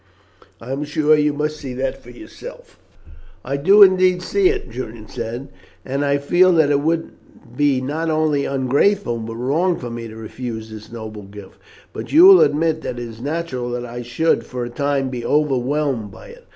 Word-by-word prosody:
I 120 +3 -8
am 140 +2 -2
sure 150 +1 +2
you 150 0 +2
must 150 +1 -3
see 135 -4 -7
that 130 +1 -3
yourself." 120 0 -12 0.7
"I 135 - -2
do 195 +9 +7
indeed 185 -1 +4
see 385 - +2
it," 410 0 -3
Julian 110 -3 -7
said, 120 +6 -6 0.4
"and 135 +2 -2
I 140 0 +2
feel 175 +6 +3
that 160 -3 +3
it 140 - +3
would 165 +2 -1 0.4
be 145 -3 +2
not 155 +5 -3
only 155 -2 +1
ungrateful 135 - +1
but 115 0 -6
wrong 155 +9 0
for 120 -2 -7
me 115 0 -6
to 110 - -11
refuse 110 0 -7
this 110 0 -11
noble 110 -2 -8
gift. 100 -1 -13 0.3
But - - -7
you 330 +4 +7
will 385 -1 +9
admit 160 +1 +2
that 120 - -5
it 120 0 -5
is 115 0 -11
natural 140 -4 -3
that 120 0 -4
I 120 0 -7
should 125 +8 0
for 125 -1 -5
a 120 - -7
time 140 0 -1
be 125 -2 -5
overwhelmed 135 -4 0
by 95 0 -13
it. - - -15
140 Hz, 190 wpm, -20 LUFS, 120-155 Hz, 0.7 s, will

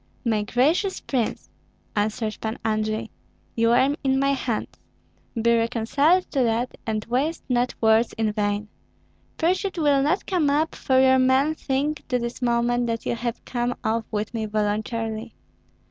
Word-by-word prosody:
"My 220 -3 +2
gracious 300 - +1
prince," 245 -5 -2 0.5
answered 215 +1 -1
Pan 220 +1 -3
Andrei, 215 0 -1 0.4
"you 230 0 +3
are 260 +4 +4
in 265 -1 +2
my 275 +1 +2
hands; 245 -4 -2 0.7
be 235 +1 +3
reconciled 245 +10 +2
to 275 - +1
that, 235 +1 0
and 215 -1 -1
waste 275 +8 -1
not 250 -1 0
words 220 +1 +4
in 220 -1 0
vain. 205 0 -1 0.7
Pursuit 370 +3 0
will 290 -4 +3
not 310 +8 +1
come 345 -7 +1
up, 305 +3 +1
for 260 -1 +1
your 260 0 +5
men 260 +4 +3
think 290 0 -2
to 250 - +1
this 235 +1 -5
moment 240 0 +1
that 230 -1 -3
you - - 0
have 235 0 -4
come 245 0 -1
off 225 +1 0
with 215 +1 -3
me 220 -2 -2
voluntarily. 215 +1 -2
240 Hz, 155 wpm, -24 LUFS, 220-275 Hz, 0.7 s, your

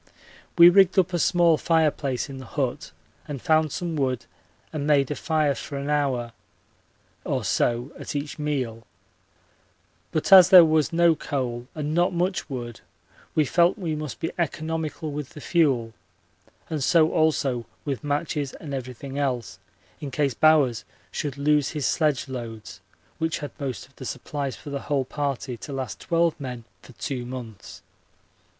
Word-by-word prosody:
We 170 0 +10
rigged 190 0 +5
up 185 -1 +3
a 175 - +1
small 170 -1 +4
fireplace 150 -6 +1
in 135 -2 -8
the 130 - -10
hut - - -3 0.4
and 145 -2 -5
found 155 +2 +2
some 170 +1 -3
wood 130 -4 -1 0.5
and 150 -2 -3
made 145 -2 +3
a - - -1
fire 155 -1 +1
for 140 +1 -6
an 140 +1 -3
hour 130 -5 0 0.9
or - - -2
so 120 +4 0
at - - -6
each 145 +2 -4
meal, 130 -7 -2 1.3
but 155 +4 +2
as 185 -2 +10
there 180 -3 +10
was 155 -1 +2
no 170 0 +4
coal 125 -5 -3
and 150 -1 -3
not 175 +3 +2
much 180 0 -1
wood 120 -4 -6 0.5
we 155 - +3
felt 170 - +3
we 170 -6 -3
must 150 -3 -5
be 165 - -2
economical 160 -1 -2
with 145 -2 -6
the - - -8
fuel, 135 -9 +1 0.7
and 155 -4 -3
so 160 +2 +4
also 145 -7 +1 0.2
with 140 0 -3
matches 145 -1 -2
and 145 -4 -8
everything 130 +1 -5
else, 125 -5 -2 0.4
in 145 - -5
case 140 0 0
Bowers 145 -7 +4 0.3
should 140 -2 -4
lose 150 0 +2
his 145 - -1
sledge 150 -3 +1
loads, 115 -4 -7 0.4
which 160 0 0
had 145 -4 -6
most 135 -4 -4
of 135 - -26
the 130 - -8
supplies 135 +2 -4
for 145 - -10
the 140 - -2
whole 140 -3 -1
party 140 -2 -3
to 140 - -9
last 135 -2 -4
twelve 170 -1 +1
men 125 -4 -6 0.2
for 130 - -15
two 120 +6 -4
months. 120 -5 -9
145 Hz, 160 wpm, -25 LUFS, 130-160 Hz, 1.3 s, We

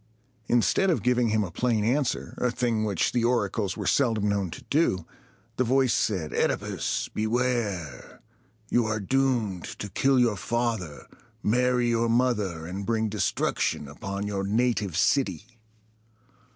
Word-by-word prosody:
Instead 120 - +3
of 170 - +1
giving 125 -1 +2
him 110 0 +2
a 90 - -5
plain 115 +2 0
answer, 130 +3 0
a 125 - +2
thing 120 -2 0
which 100 -5 0
the 120 - 0
oracles 110 -4 0
were - - -4
seldom 115 -6 +2
known 100 -3 0
to 80 - -9
do, 120 - +1 0.5
the 130 - +3
voice 130 0 +2
said, 90 -8 0
"OEdipus, - - -1
beware! 110 - -2 0.5
You 120 -2 +3
are 110 0 -1
doomed 115 -5 0
to 105 - -6
kill 135 +6 +3
your 115 -4 +2
father, 115 -9 -2 0.4
marry 125 +2 +2
your 115 0 +1
mother, 105 -9 0
and 95 +4 -5
bring 110 +1 0
destruction 100 -7 -1
upon 100 +8 -5
your 100 -1 -2
native 105 -4 0
city!" 115 - 0
110 Hz, 140 wpm, -26 LUFS, 100-125 Hz, 0.5 s, Instead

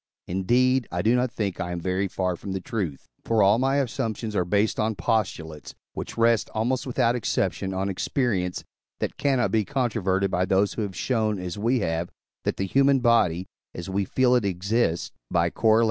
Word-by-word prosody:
Indeed, 125 +8 +2
I 90 0 -1
do 115 +3 +4
not 125 +1 +1
think 105 -6 -3
I 90 - -3
am 90 - -3
very 95 +3 -1
far 90 -1 -1
from 95 +3 -6
the 95 - -2
truth, 90 -8 -4 0.2
for 115 -2 +2
all 100 +4 +5
my 135 +1 +2
assumptions 115 -5 -2
are 90 - +2
based 100 +4 +1
on 110 0 0
postulates, 85 -6 -2 0.2
which - - -6
rest, 115 -1 +3
almost 125 +4 0
without 125 -1 +2
exception, 100 -4 -1
on 95 +1 -1
experience, 95 -2 -1 0.4
that - - -2
cannot 135 -4 +1
be 110 -1 +2
controverted 105 -8 0
by 90 +1 +1
those 95 +2 +2
who - - -3
have 100 -3 -4
shown, 110 -1 0
as 90 -2 -5
we 120 +3 +1
have, 80 -1 -1 0.4
that - - -1
the 95 - -1
human 135 +6 +3
body, 105 -8 +3 0.3
as 90 +2 -6
we 100 +1 +1
feel 125 +6 +2
it, 125 -3 +3
exists 95 -1 0 0.2
(Coroll. 110 0 +3
105 Hz, 185 wpm, -25 LUFS, 95-120 Hz, 0.4 s, all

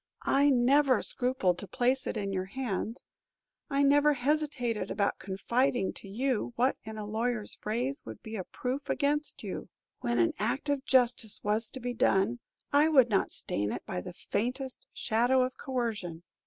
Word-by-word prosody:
I 280 +1 +4
never 265 +1 +4
scrupled 245 -9 0
to 200 - -6
place 250 +7 +1
it - - -2
in 200 -2 -2
your 185 -1 -1
hands; 225 0 -4 0.7
I 280 0 +2
never 290 +1 +5
hesitated 270 -6 -1
about 200 0 0
confiding 235 +3 0
to - - -11
you 245 +3 -1
what 255 +3 +2
in 220 0 -7
a 210 - -4
lawyer's 220 +1 -2
phrase 245 +6 -2
would - - -10
be 220 0 -6
a 190 - -3
proof 260 +8 -4
against 295 +1 0
you. - - -5 0.3
When 240 -1 -1
an 335 -2 +3
act 285 +1 -1
of 280 -2 0
justice 245 -4 +3
was 215 +2 +1
to 260 - -5
be 245 0 -3
done, 220 +1 +2 0.3
I 295 +2 +5
would 265 -6 +6
not 195 - +2
stain 105 +1 -1
it - - -5
by 185 -4 -3
the 180 - -8
faintest 250 +8 -3
shadow 245 +3 +2
of 255 0 -3
coercion. 220 - -3
245 Hz, 170 wpm, -30 LUFS, 210-270 Hz, 0.7 s, would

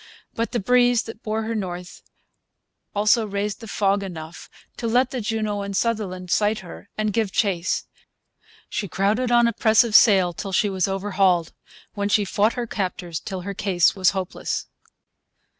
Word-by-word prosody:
But 230 +1 -2
the 240 - 0
breeze 245 +2 +3
that 225 0 -10
bore 220 +1 -2
her 225 +1 -3
north 180 -4 -5 0.9
also 215 +2 +3
raised 200 +1 -3
the 225 - -10
fog 200 -1 +1
enough 170 -4 -8 0.3
to 230 - -3
let 250 +3 +2
the 255 - -3
Juno 215 -2 -2
and 200 -1 -3
Sutherland 195 -5 -2
sight 210 +1 +2
her 185 +2 -11
and 215 -1 0
give 220 -3 0
chase. 185 -5 0 0.8
She 205 - -3
crowded 210 +8 0
on 240 0 +5
a 235 - 0
press 220 +2 +4
of 230 -3 -4
sail 190 -6 +6
till 195 +2 -6
she 205 +2 +2
was 190 -1 0
overhauled, 195 -3 +1 0.4
when 205 -1 -2
she 205 0 +3
fought 205 +3 +1
her 245 -1 -3
captors 180 -6 -4
till 190 -3 -6
her 200 +2 -5
case 190 -4 +2
was 185 -2 +4
hopeless. 190 -2 -3
205 Hz, 170 wpm, -23 LUFS, 190-225 Hz, 0.9 s, sail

